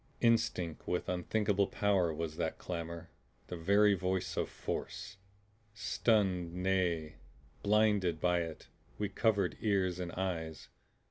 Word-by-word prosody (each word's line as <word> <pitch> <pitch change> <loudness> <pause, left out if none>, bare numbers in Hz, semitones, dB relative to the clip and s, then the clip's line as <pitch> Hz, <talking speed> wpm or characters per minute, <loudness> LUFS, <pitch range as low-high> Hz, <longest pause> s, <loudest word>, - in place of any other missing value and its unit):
Instinct 115 -8 +1
with 90 - -1
unthinkable 100 +2 +1
power 95 -5 +2
was 80 0 -4
that - - -1
clamor; 85 -1 -5 0.4
the - - -4
very 100 +5 +4
voice 95 -1 -1
of - - -1
Force. 95 - -5 0.6
Stunned, 95 -4 +1
nay 90 -4 0 0.4
BLINDED, 105 -5 +3
by 90 +1 +2
it, 80 -2 -6 0.3
we 105 -1 -1
covered 100 -2 +1
ears 95 -4 +1
and 90 -1 -3
eyes. 80 -4 -3
90 Hz, 120 wpm, -33 LUFS, 85-100 Hz, 0.6 s, very